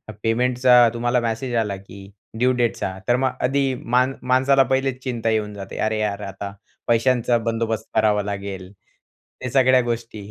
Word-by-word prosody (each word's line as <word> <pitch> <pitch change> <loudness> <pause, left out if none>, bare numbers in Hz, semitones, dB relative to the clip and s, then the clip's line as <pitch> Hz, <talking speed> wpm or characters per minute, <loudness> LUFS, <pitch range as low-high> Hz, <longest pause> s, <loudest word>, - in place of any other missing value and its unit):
पे - - -29
पेमेंटचा 125 +1 +4
तुम्हाला 120 +1 +1
मॅसेज 115 +2 -3
आला 105 -4 0
की 95 0 -12 0.3
ड्यू 125 +2 +3
डेटचा 115 -6 -1
तर 120 - +4
मग 130 +1 +1
आधी 135 +1 +1
मा 125 +1 +1 0.2
माणसाला 130 +2 +3
पहिलेच 130 -1 -1
चिंता 120 -3 -2
येऊन 105 -1 -1
जाते, 100 -1 -8
अरे, 110 0 0
यार! 105 -1 -2
आता 100 0 -6 0.4
पैशांचा 120 0 +2
बंदोबस्त 115 -1 -2
करावा 105 -1 +3
लागेल 100 -2 -6 0.7
या 125 - -2
सगळ्या 130 0 +4
गोष्टी. 115 -2 -4
115 Hz, 155 wpm, -22 LUFS, 105-125 Hz, 0.7 s, पेमेंटचा